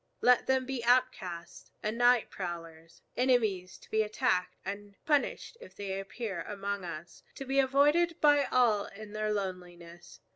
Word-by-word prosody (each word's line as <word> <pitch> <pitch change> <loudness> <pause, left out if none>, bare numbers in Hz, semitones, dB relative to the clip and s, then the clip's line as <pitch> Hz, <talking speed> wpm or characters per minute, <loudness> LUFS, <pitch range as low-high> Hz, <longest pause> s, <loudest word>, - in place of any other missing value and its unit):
Let 250 0 +4
them 265 -1 +2
be 260 -2 -4
outcasts 235 -9 0
and 215 +1 -1
night 245 -1 +3
prowlers, 165 -2 -8
enemies 220 -8 +1
to - - -19
be 220 - +3
attacked 210 -4 0
and 200 +1 -6
punished 295 +9 0
if 480 - -13
they 195 -1 -4
appear 195 -2 -5
among 200 0 -4
us, 170 -1 -8
to 270 - -7
be 270 +1 +1
avoided 295 +6 +3
by 290 -1 +5
all 225 -5 +2
in 210 +1 -11
their 215 0 -1
loneliness. 175 -3 -6
210 Hz, 150 wpm, -30 LUFS, 185-255 Hz, -, by